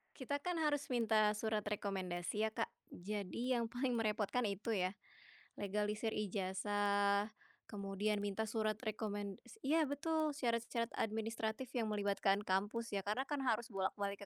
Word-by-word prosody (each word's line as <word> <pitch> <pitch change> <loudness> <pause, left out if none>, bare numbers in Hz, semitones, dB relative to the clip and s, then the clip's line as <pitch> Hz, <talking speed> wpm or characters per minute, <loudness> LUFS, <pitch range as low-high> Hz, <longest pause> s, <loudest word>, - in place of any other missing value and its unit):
Kita 280 +1 -1
kan 355 -2 0
harus 290 -3 +1
minta 220 -3 +4
surat 215 0 0
rekomendasi 195 -1 -1
ya, 220 - +1
Kak. - - 0 0.2
Jadi 210 +6 -1
yang 235 - +1
paling 245 +2 0
merepotkan 220 +2 +1
itu 200 +1 -2
ya. 190 -4 +2 0.6
Legalisir 210 +2 0
ijazah, 205 +1 +1 0.4
kemudian 205 +1 0
minta 205 +2 -1
surat 215 -1 +1
rekomendasi 210 - -4
iya 315 +3 +4
betul, 310 +2 +1
syarat-syarat 235 -3 0
administratif 225 +2 -1
yang 220 -3 +1
melibatkan 200 -1 +2
kampus 210 +4 0
ya, 195 -2 -2
karena 210 +5 +1
kan 290 - 0
harus 235 0 +1
bolak-balik 200 0 -2
215 Hz, 135 wpm, -38 LUFS, 200-235 Hz, 0.6 s, minta